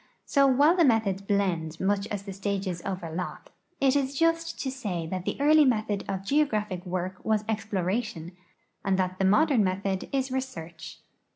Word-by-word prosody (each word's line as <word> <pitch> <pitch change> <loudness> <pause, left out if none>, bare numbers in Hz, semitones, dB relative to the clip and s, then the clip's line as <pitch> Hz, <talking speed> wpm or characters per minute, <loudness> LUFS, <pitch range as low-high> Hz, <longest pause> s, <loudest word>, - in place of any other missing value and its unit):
So, 275 -1 +4
while 285 +6 +5
the 350 - +4
methods 220 -8 +2
blend 185 -6 -1
much 200 +1 0
as 205 -1 -4
the 195 -1 -7
stages 195 -2 -3
overlap, 180 -2 -5 0.3
it 275 0 +3
is 275 -1 0
just 330 +1 +1
to 265 - -2
say 205 -11 -4
that 185 +2 -4
the - - -2
early 305 +2 +6
method 215 -6 0
of 190 0 -3
geographic 210 -8 0
work 185 +1 -4
was 215 -1 +1
exploration, 200 -4 -2 0.5
and 195 -1 +1
that 185 0 -1
the 195 - +2
modern 250 +4 +4
method 190 0 -2
is 270 -1 -1
research. 255 -11 -6
200 Hz, 165 wpm, -27 LUFS, 185-265 Hz, 0.5 s, early